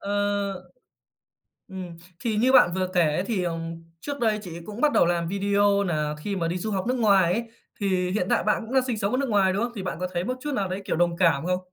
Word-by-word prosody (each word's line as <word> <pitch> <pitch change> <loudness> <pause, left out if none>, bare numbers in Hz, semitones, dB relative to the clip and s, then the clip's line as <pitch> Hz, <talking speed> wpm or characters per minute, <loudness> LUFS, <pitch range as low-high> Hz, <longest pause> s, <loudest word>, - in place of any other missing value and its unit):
Ờ, 200 -1 -2 1.0
ừm. 185 -3 -8 0.2
Thì 230 -4 -1
như 255 +4 +3
bạn 175 -9 +6
vừa 185 -1 0
kể 175 - +4
ấy, 155 +3 +1
thì, 195 -4 -1
ừm, 165 -1 -4 0.2
trước 285 -1 -5
đây 220 -2 +1
chị 170 -3 -8
ấy - - -9
cũng 215 +3 -7
bắt 300 - +4
đầu - - +4
làm 170 -1 0
video 200 +1 +2
nà 150 -5 -1
khi 200 +5 -3
mà 170 -3 -1
đi 175 +2 -2
du 215 +4 -3
học 190 0 -1
nước 255 - +1
ngoài 195 -6 +4
ấy, 230 +4 -1 0.4
thì 185 -3 0
hiện 185 -2 0
tại - - +2
bạn 210 - +1
cũng 245 - -8
đang 260 -1 +3
sinh 240 -4 -2
sống 200 -1 -1
ở 255 - +1
nước 275 -2 -1
ngoài, 195 -3 +3
đúng 205 - 0
không? 235 - -2
Thì 195 - -5
bạn 185 - -4
có 185 - -1
thấy 175 0 -1
một 255 +4 -2
chút 295 +1 -3
nào 200 -6 0
đấy, 190 +2 -3
kiểu, - - -1
đồng 170 0 +1
cảm 165 -4 +3
không? 180 0 0
195 Hz, 270 wpm, -25 LUFS, 175-215 Hz, 1.0 s, bạn